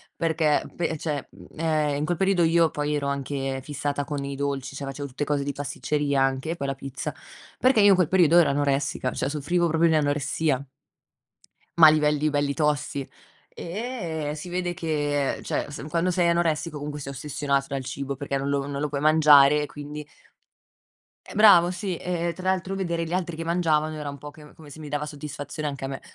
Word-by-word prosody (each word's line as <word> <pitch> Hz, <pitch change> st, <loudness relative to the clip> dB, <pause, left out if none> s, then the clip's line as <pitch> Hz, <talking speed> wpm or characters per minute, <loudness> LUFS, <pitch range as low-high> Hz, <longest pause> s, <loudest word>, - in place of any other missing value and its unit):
perché 160 Hz, -2 st, +1 dB
pe 165 Hz, -2 st, -1 dB
cioè, 150 Hz, -3 st, -3 dB, 0.3 s
ehm, 155 Hz, -2 st, +1 dB
in 145 Hz, +2 st, -1 dB
quel 175 Hz, -, 0 dB
periodo 190 Hz, -1 st, +2 dB
io 165 Hz, 0 st, +4 dB
poi 150 Hz, 0 st, -2 dB
ero 140 Hz, -1 st, -1 dB
anche 135 Hz, -1 st, -2 dB
fissata 145 Hz, 0 st, -3 dB
con 145 Hz, -2 st, -4 dB
i 140 Hz, 0 st, -4 dB
dolci. 140 Hz, -1 st, -3 dB
Cioè, 140 Hz, -, -5 dB
facevo 140 Hz, +1 st, -5 dB
tutte 135 Hz, +2 st, -4 dB
cose 145 Hz, -1 st, 0 dB
di 145 Hz, -, -2 dB
pasticceria 145 Hz, 0 st, -1 dB
anche, 135 Hz, +3 st, 0 dB
e 170 Hz, -, -2 dB
poi 140 Hz, -4 st, -4 dB
la 135 Hz, -, -2 dB
pizza, 135 Hz, 0 st, -5 dB, 0.5 s
perché 255 Hz, -3 st, +4 dB
io 205 Hz, -, +7 dB
in 195 Hz, -, +7 dB
quel 180 Hz, -3 st, +2 dB
periodo 175 Hz, -2 st, +4 dB
ero 170 Hz, -, +6 dB
anoressica, 140 Hz, -2 st, 0 dB
cioè -, -, -2 dB
soffrivo 160 Hz, +4 st, 0 dB
proprio 165 Hz, +1 st, +3 dB
di 160 Hz, -, +3 dB
anoressia. 145 Hz, -1 st, 0 dB, 1.1 s
Ma 165 Hz, -2 st, +9 dB
a -, -, +10 dB
livelli 150 Hz, 0 st, +2 dB
belli 145 Hz, -1 st, 0 dB
tosti, 150 Hz, -2 st, -1 dB, 0.4 s
e 170 Hz, -, -4 dB
si 165 Hz, +4 st, -8 dB
vede 180 Hz, 0 st, -2 dB
che, 145 Hz, -4 st, -1 dB
cioè -, -, -2 dB
s 145 Hz, -1 st, -7 dB
quando 170 Hz, +3 st, +1 dB
sei 175 Hz, -1 st, +2 dB
anoressico 165 Hz, -2 st, 0 dB
comunque 145 Hz, 0 st, -5 dB
sei 140 Hz, 0 st, -6 dB
ossessionato 140 Hz, 0 st, -1 dB
dal 135 Hz, -1 st, -3 dB
cibo 140 Hz, +1 st, -4 dB
perché 140 Hz, 0 st, -3 dB
non 140 Hz, +1 st, -2 dB
lo 140 Hz, -1 st, 0 dB
non 140 Hz, 0 st, -4 dB
lo 150 Hz, -, -1 dB
puoi 140 Hz, -1 st, -3 dB
mangiare, 150 Hz, -2 st, +6 dB
e -, -, -1 dB
quindi 150 Hz, 0 st, -8 dB, 1.2 s
eh, -, -, -12 dB
bravo, 185 Hz, -5 st, +7 dB
sì, 185 Hz, 0 st, -3 dB
e 170 Hz, -1 st, -2 dB
tra 185 Hz, +1 st, -2 dB
l'altro 190 Hz, +1 st, -2 dB
vedere 170 Hz, -3 st, -2 dB
gli 165 Hz, -, -5 dB
altri 175 Hz, -2 st, -2 dB
che 165 Hz, -, -5 dB
mangiavano 160 Hz, -2 st, +1 dB
era 150 Hz, -2 st, -5 dB
un 140 Hz, -, -8 dB
po' 145 Hz, -, -8 dB
che 150 Hz, 0 st, -15 dB
come 155 Hz, -2 st, -14 dB
se 145 Hz, -, -11 dB
mi 150 Hz, -2 st, -8 dB
dava 150 Hz, +1 st, -2 dB
soddisfazione 145 Hz, 0 st, -6 dB
anche 140 Hz, -1 st, -6 dB
a -, -, -3 dB
me. 135 Hz, -1 st, -6 dB
150 Hz, 205 wpm, -25 LUFS, 140-165 Hz, 1.2 s, a